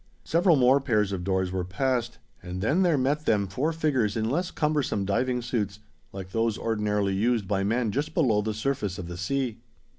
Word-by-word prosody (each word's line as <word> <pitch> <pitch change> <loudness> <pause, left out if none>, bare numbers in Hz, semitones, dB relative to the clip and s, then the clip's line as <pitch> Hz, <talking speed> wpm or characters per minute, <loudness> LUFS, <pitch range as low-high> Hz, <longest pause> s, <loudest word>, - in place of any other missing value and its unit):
Several 170 +1 +3
more 130 +1 +4
pairs 105 -7 +1
of 95 -2 -3
doors 95 -1 0
were 95 -1 -2
passed, 120 +5 -1 0.2
and 90 0 -6
then 145 - +2
there 175 -5 +3
met 145 +4 0
them 105 -2 +3
four 130 - -1
figures 135 -10 0
in 110 +1 0
less 175 +5 0
cumbersome 150 - 0
diving 125 +5 0
suits, 105 -5 -2 0.3
like 95 -1 -8
those 115 0 0
ordinarily 105 -3 0
used 110 +1 +1
by 95 0 0
men 115 +2 0
just 145 +7 -3
below 120 - +3
the 110 0 -3
surface 110 -5 -2
of 90 - -6
the 90 - -6
sea. 125 +5 -2
115 Hz, 190 wpm, -26 LUFS, 100-135 Hz, 0.3 s, more